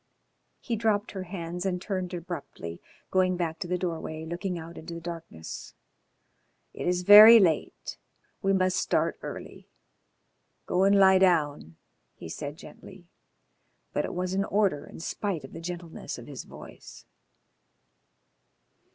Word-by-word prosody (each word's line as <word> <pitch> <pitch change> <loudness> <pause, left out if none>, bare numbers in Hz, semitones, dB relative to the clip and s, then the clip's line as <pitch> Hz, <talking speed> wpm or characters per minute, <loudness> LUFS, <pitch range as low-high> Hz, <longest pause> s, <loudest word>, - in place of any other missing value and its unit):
He 235 - -2
dropped 215 -2 0
her 190 -2 -6
hands 175 -1 -5
and 185 -2 -1
turned 185 -1 -3
abruptly, 165 - -7 0.3
going 185 -1 +2
back 165 -2 -3
to 185 - -4
the 180 +1 0
doorway, 160 -3 -4
looking 175 +2 -4
out 165 +1 -9
into 170 +1 -8
the - - -6
darkness. 165 - -8 1.0
"It - - -5
is 180 0 +1
very 215 +4 +11
late. 165 -7 0 0.4
We 195 - +1
must 185 -1 +2
start - - 0
early. - - -9 1.0
Go 185 +1 +2
and 200 +1 +5
lie 190 -1 +6
down," 150 - +1 0.4
he 80 - -10
said 145 - -6
gently, 180 0 -14 0.8
but - - 0
it - - -5
was 180 +1 -2
an 195 +1 0
order 195 -9 0
in - - -11
spite 175 -1 -3
of 135 - -11
the - - -8
gentleness 170 -1 -6
of - - -10
his - - -8
voice. - - -13
180 Hz, 145 wpm, -27 LUFS, 165-190 Hz, 1.0 s, very